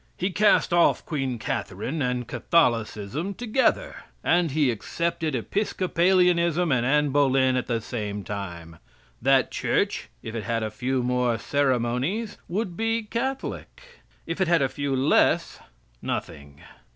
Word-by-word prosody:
He 185 +2 -1
cast 210 -2 +3
off 175 -1 +3
Queen 135 -5 -2
Catherine 110 - -3
and 125 -2 -1
Catholicism 120 - 0
together. 250 - 0 0.3
And 175 -1 +3
he 145 -2 +2
accepted 165 +6 -2
Episcopalianism 180 - +2
and 125 -3 +2
Annie 150 +3 +2
Boleyn 135 -2 +3
at 125 - -1
the 115 -1 0
same 105 -3 -4
time. 85 -5 -7 0.4
That 135 +2 +3
Church, - - -1
if 110 - -6
it 115 -2 -4
had 115 0 -1
a 110 - -3
few 125 +3 -1
more 125 -1 +1
ceremonies, 135 - -1
would 185 0 -2
be 225 +2 0
Catholic. 260 +5 -4 0.5
If 165 +4 -4
it 190 - +3
had 170 -4 +3
a 135 - +1
few 140 -1 -2
less, 130 +3 +2 0.4
nothing. 70 -2 -5
135 Hz, 135 wpm, -25 LUFS, 120-175 Hz, 0.5 s, cast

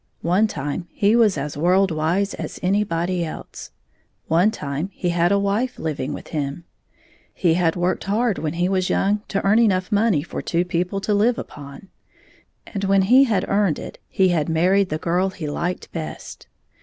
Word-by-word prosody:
One 185 +6 +3
time 145 0 -4
he 205 +6 +2
was 220 -7 +4
as 140 +1 -4
world 180 +5 +3
wise 170 +6 0
as - - -6
anybody 180 -2 0
else. 160 - -8 0.6
One 175 +6 +3
time 150 -3 -4
he 180 - -2
had 175 +1 +2
a 200 - +4
wife 200 +6 -1
living 150 -3 -3
with - - -8
him. 145 +1 -3 0.7
He 170 -3 +2
had 165 -1 +1
13 175 - -4
worked 180 - 0
hard 215 +1 0
when 155 -1 -2
he 175 +1 0
was 185 -1 0
young 205 +2 +1
to 200 - -2
earn 205 +3 +4
enough 190 -4 +2
money 205 -7 +2
for - - -6
two 175 +1 0
people 180 +2 -2
to 210 - 0
live 225 +4 +2
upon, 140 +5 -9 0.8
and 200 -2 -5
when 195 0 +3
he 255 +7 +6
had 210 -7 0
earned 200 -6 +1
it - - -9
he 190 -1 +2
had 165 -3 0
married 185 +4 +2
the 155 - -1
girl 175 +4 0
he 175 -5 -6
liked 175 +5 -3
best. 160 -2 -7
180 Hz, 185 wpm, -22 LUFS, 165-200 Hz, 0.8 s, he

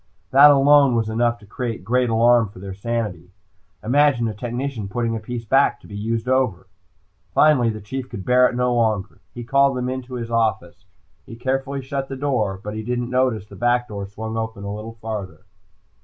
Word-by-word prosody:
That 140 +2 +8
alone 140 -2 +5
was 110 -1 0
enough 120 +1 +1
to 105 - -17
create 115 -1 -5
great 125 +2 +1
alarm 115 -1 +4
for 100 - -16
their 95 +1 -7
sanity. 100 -4 -4 0.5
Imagine 130 0 +3
a 110 - -3
technician 120 0 -4
putting 115 +3 -2
a - - -3
piece 115 +2 -6
back 135 +6 +3
to - - -20
be 100 - -10
used 115 +3 -2
over! 130 -8 +1 0.7
Finally 140 -6 +4
the 110 -1 -5
Chief 130 +5 -6
could 100 -6 -7
bear 125 0 +5
it - - -6
no 125 0 +1
longer. 110 -5 0 0.2
He 120 - -6
called 140 +2 +2
them 125 0 -2
into 130 0 -5
his 115 -1 -5
office. 110 -6 -1 0.4
He 115 - -9
carefully 135 +2 -2
shut 135 +1 -4
the 135 - -4
door, 125 -9 -1
but 105 - -5
he 110 - -4
didn't 120 +2 -3
notice 125 -5 +1
the - - -14
back 120 0 +1
door 100 -2 -5
swung 110 +3 -6
open 110 -2 -4
a 100 0 -4
little 110 +2 -7
farther. 100 -7 -6
115 Hz, 200 wpm, -22 LUFS, 110-130 Hz, 0.7 s, That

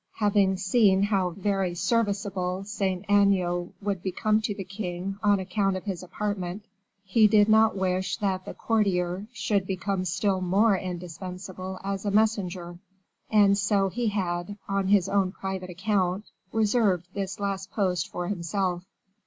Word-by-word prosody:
Having 205 -3 +2
seen 190 0 +3
how 195 -3 +1
very 195 -1 -1
serviceable 195 -3 -1
Saint 195 -2 -2
Aignan 190 -3 +2
would 200 -3 -1
become 215 +4 +1
to 215 -2 -2
the 195 - -5
king 190 0 -5
on 205 -2 +3
account 195 +1 0
of 185 - -7
his 190 -5 -4
apartment, 190 +1 -4 0.4
he 210 +3 +4
did 210 0 +5
not 220 -1 +4
wish 185 0 0
that 190 -3 -1
the - - -8
courtier 195 -3 0
should 205 -4 -1
become 190 0 -2
still 190 +2 0
more 195 +4 +3
indispensable 185 +1 -6
as 195 0 -3
a 205 - 0
messenger, 190 -5 0 0.5
and 205 -2 +5
so 200 -1 +2
he 240 +4 -2
had, 185 -1 -2
on 195 -1 0
his 195 -2 +4
own 195 -2 +1
private 190 -1 -5
account, 190 +1 0 0.3
reserved 210 -5 +2
this 195 0 -4
last 195 -1 -3
post 185 -5 -1
for 175 0 -4
himself. 180 -1 -2
195 Hz, 145 wpm, -27 LUFS, 185-205 Hz, 0.5 s, did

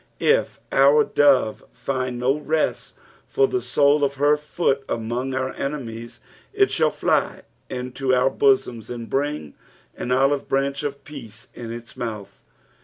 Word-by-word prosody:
If - - +2
our 140 +2 +5
dove 135 -8 +3
find 130 -2 -3
no 125 +3 +2
rest 155 +1 -1 0.3
for 420 -1 +2
the 380 -1 -1
sole 145 - +3
ot 140 0 +1
hei 145 +2 +4
foot 150 -2 -1
among 120 +3 -2
our 130 0 -2
enemies, 120 -5 -5 0.3
it 400 -1 +3
shall - - +3
fly - - 0 0.3
into 125 +1 -3
our 130 +1 +3
bosoms 125 -5 +1
and 120 -2 -6
bring 140 - -2 0.4
an 125 - -4
olive 135 +2 +2
branch 135 +1 0
of 140 -1 -5
peace 115 -7 -10
in 115 -1 -7
its 120 0 -8
mouth. 110 -4 -6
135 Hz, 145 wpm, -23 LUFS, 120-145 Hz, 0.4 s, our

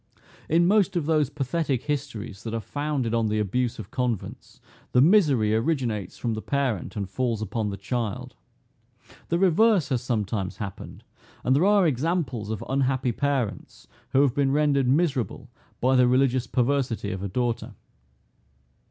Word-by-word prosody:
In 170 +2 +4
most 200 -1 +3
of 170 -4 0
those 155 -3 +2
pathetic 140 -2 -2
histories 120 -8 -4
that 115 0 -4
are - - -1
founded 145 -2 -2
on 115 -1 +1
the 105 0 0
abuse 115 +4 -1
of 110 0 -9
convents, 125 -5 -4 0.3
the 125 - +5
misery 140 - +4
originates 115 - -1
from 115 - -2
the 110 - -4
parent, 130 -8 -2
and 100 -3 -3
falls 115 +2 -1
upon 110 0 -2
the 100 - -5
child. 110 +1 -3 1.0
The 170 - +1
reverse 190 0 +3
has 130 -4 0
sometime 105 -5 -2
happened; 100 -1 -8 0.4
and 130 - +3
there 155 +6 +3
are 205 -2 +4
examples 140 - -1
of 110 -2 -4
unhappy 130 -1 +1
parents, 135 -3 -3 0.2
who 135 - +4
have 135 -4 +2
been 140 -1 +1
rendered 140 -2 +2
miserable 135 - 0 0.3
by 130 +2 +3
the 125 -1 +5
religious 130 0 +2
perversity 125 -5 0
of 95 0 -5
a 100 - -2
daughter. 120 +4 -2
125 Hz, 155 wpm, -25 LUFS, 110-145 Hz, 1.0 s, the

